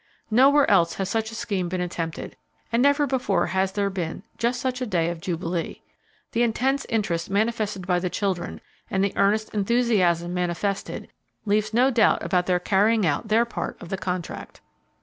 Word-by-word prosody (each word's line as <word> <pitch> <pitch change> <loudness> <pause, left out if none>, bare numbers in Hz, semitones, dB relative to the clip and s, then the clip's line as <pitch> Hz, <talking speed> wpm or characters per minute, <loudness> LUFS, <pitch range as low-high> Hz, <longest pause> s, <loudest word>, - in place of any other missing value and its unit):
Nowhere 275 +5 +5
else 170 -4 +3
has 195 -1 -2
such 220 0 -1
a - - -8
scheme 190 -5 -2
been 185 +1 -2
attempted, 170 -2 -4 0.4
and 230 +1 +2
never 285 +2 +4
before 250 -10 +1
has 190 0 0
there 200 -1 0
been 175 -4 -4 0.2
just 240 +1 0
such 255 0 -2
a 250 - -1
day 170 -5 +1
of 170 -1 -7
jubilee. 170 -1 -3 0.5
The 235 - 0
intense 260 +4 +1
interest 175 -7 -1
manifested 210 -2 -1
by 180 -1 +2
the 180 0 -2
children, 185 -3 -2 0.3
and 190 -1 +1
the 200 - 0
earnest 215 +2 +1
enthusiasm 195 -6 +2
manifested, 180 +3 -2 0.4
leaves 210 +1 +1
no 250 +4 +3
doubt 235 -2 +3
about 180 0 +1
their 180 -1 +2
carrying 205 +3 +2
out 155 +7 0
their 225 +2 +3
part 235 - -5
of 175 - -10
the 195 - -1
contract. 180 -2 -5
200 Hz, 175 wpm, -24 LUFS, 180-230 Hz, 0.5 s, Nowhere